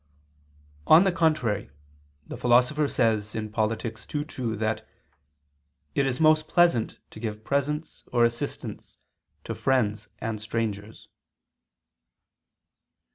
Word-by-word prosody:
On 160 Hz, +4 st, +8 dB
the 190 Hz, -, +2 dB
contrary, 155 Hz, -, +1 dB, 0.6 s
The -, -, -7 dB
Philosopher 125 Hz, +5 st, +3 dB
says 110 Hz, -4 st, 0 dB, 0.2 s
(Polit. 110 Hz, +1 st, 0 dB
ii, 115 Hz, +6 st, -4 dB
2) 125 Hz, -7 st, -4 dB
that 110 Hz, +1 st, -2 dB, 1.0 s
"it 140 Hz, -1 st, +2 dB
is 125 Hz, -2 st, -1 dB
most 155 Hz, 0 st, +4 dB
pleasant 170 Hz, -10 st, +3 dB
to -, -, -11 dB
give 110 Hz, -1 st, -5 dB
presents 150 Hz, +4 st, -2 dB
or 120 Hz, -1 st, +4 dB
assistance 120 Hz, 0 st, -4 dB, 0.5 s
to -, -, -4 dB
friends 110 Hz, -6 st, 0 dB
and 110 Hz, -1 st, -4 dB
strangers." 105 Hz, -1 st, -4 dB
120 Hz, 105 wpm, -26 LUFS, 110-150 Hz, 1.0 s, On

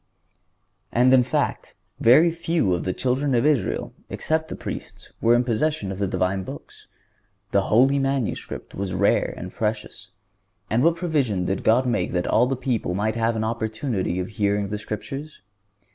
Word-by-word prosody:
(136) -, -, -2 dB
And, 130 Hz, +1 st, +6 dB
in 130 Hz, -, +7 dB
fact, 120 Hz, -, -2 dB, 0.2 s
very 150 Hz, +9 st, +6 dB
few 165 Hz, -, 0 dB
of 85 Hz, -, -2 dB
the 95 Hz, -, 0 dB
children 130 Hz, +5 st, 0 dB
of 120 Hz, +3 st, +2 dB
Israel, 150 Hz, -5 st, 0 dB, 0.2 s
except 160 Hz, 0 st, -1 dB
the -, -, -6 dB
Priests, -, -, -8 dB
were 115 Hz, +1 st, +5 dB
in 120 Hz, -, +3 dB
possession 120 Hz, -2 st, -1 dB
of 95 Hz, -, -6 dB
the 100 Hz, -, 0 dB
Divine 95 Hz, +1 st, 0 dB
Books. -, -, -11 dB, 0.6 s
The 100 Hz, -, +3 dB
holy 135 Hz, +5 st, +4 dB
manuscript 135 Hz, -4 st, -3 dB
was 95 Hz, -2 st, -3 dB
rare 100 Hz, +2 st, +2 dB
and 90 Hz, +1 st, -7 dB
precious. 105 Hz, -1 st, -4 dB, 0.6 s
And 115 Hz, +4 st, +2 dB
what 165 Hz, 0 st, +4 dB
provision 140 Hz, -, 0 dB
did 95 Hz, +1 st, -2 dB
God 120 Hz, +4 st, +4 dB
make 120 Hz, -1 st, 0 dB
that 90 Hz, -1 st, 0 dB
all 120 Hz, +3 st, +3 dB
the 135 Hz, -, 0 dB
people 120 Hz, -8 st, -2 dB
might 110 Hz, +3 st, 0 dB
have 115 Hz, 0 st, +1 dB
an 110 Hz, -, -1 dB
opportunity 110 Hz, -3 st, -2 dB
of 90 Hz, -, -3 dB
hearing 100 Hz, -2 st, 0 dB
the 105 Hz, 0 st, -3 dB
Scriptures? 135 Hz, +9 st, -6 dB
115 Hz, 175 wpm, -24 LUFS, 100-135 Hz, 0.6 s, in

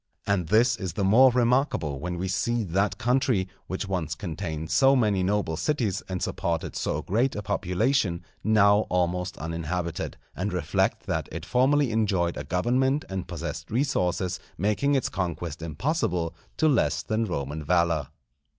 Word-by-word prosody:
And 95 Hz, -5 st, 0 dB
this 115 Hz, +5 st, +4 dB
is 95 Hz, -5 st, -4 dB
the 100 Hz, -, -1 dB
more 115 Hz, +7 st, +7 dB
remarkable 120 Hz, -, +1 dB
when 90 Hz, +3 st, -4 dB
we 95 Hz, +2 st, -2 dB
see 120 Hz, +5 st, 0 dB
that 95 Hz, +2 st, 0 dB
country, 125 Hz, -5 st, +1 dB, 0.2 s
which 95 Hz, +2 st, -3 dB
once 85 Hz, -4 st, -2 dB
contained 80 Hz, -3 st, -5 dB
so 135 Hz, +12 st, +5 dB
many 105 Hz, -6 st, +2 dB
noble 95 Hz, -3 st, 0 dB
cities, 110 Hz, -, 0 dB
and 90 Hz, -1 st, -3 dB
supported 85 Hz, -1 st, -2 dB
so -, -, -2 dB
great 120 Hz, +7 st, +1 dB
a 105 Hz, -, -4 dB
population, 95 Hz, -1 st, 0 dB, 0.2 s
now 105 Hz, -1 st, +4 dB
almost 90 Hz, +1 st, 0 dB
uninhabited; 85 Hz, +1 st, -3 dB, 0.2 s
and -, -, -2 dB
reflect -, -, 0 dB
that -, -, -2 dB
it 85 Hz, +1 st, -6 dB
formerly 130 Hz, +3 st, +3 dB
enjoyed 95 Hz, -6 st, +1 dB
a -, -, -4 dB
government 125 Hz, -, +1 dB
and 95 Hz, -2 st, -4 dB
possessed 85 Hz, -2 st, -5 dB
resources 95 Hz, -8 st, 0 dB, 0.2 s
making 105 Hz, -, +1 dB
its 135 Hz, -, +1 dB
conquest 85 Hz, -3 st, -4 dB
impossible 85 Hz, -, -1 dB, 0.2 s
to 160 Hz, -, +3 dB
less 140 Hz, -6 st, +2 dB
than 110 Hz, +1 st, 0 dB
Roman 75 Hz, -4 st, -4 dB
valour. 85 Hz, -3 st, +2 dB
95 Hz, 150 wpm, -26 LUFS, 85-120 Hz, 0.2 s, more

